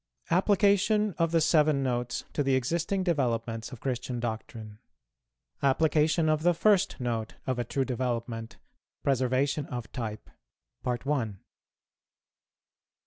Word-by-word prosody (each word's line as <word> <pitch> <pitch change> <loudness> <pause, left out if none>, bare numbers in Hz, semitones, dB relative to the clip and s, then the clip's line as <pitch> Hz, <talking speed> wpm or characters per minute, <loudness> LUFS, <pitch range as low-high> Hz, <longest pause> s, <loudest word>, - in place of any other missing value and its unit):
APPLICATION 205 +2 +3
OF 165 0 +3
THE 165 - +4
SEVEN 155 -3 +3
NOTES 125 -1 -1
TO - - 0
THE 135 -1 +2
EXISTING 170 +9 0
DEVELOPMENTS 120 -9 -1
OF 130 - -9
CHRISTIAN 125 -1 -3
DOCTRINE. 110 -2 -5 0.8
APPLICATION 155 +3 +3
OF 155 -1 +2
THE 175 +1 +3
FIRST 200 +1 +3
NOTE 115 -3 -3
OF 130 -2 -1
A - - +1
TRUE 135 +3 -1
DEVELOPMENT. 120 -2 -3 0.5
PRESERVATION 135 +2 +1
OF 120 -2 -6
TYPE. 110 -4 -5
135 Hz, 110 wpm, -28 LUFS, 120-165 Hz, 0.8 s, THE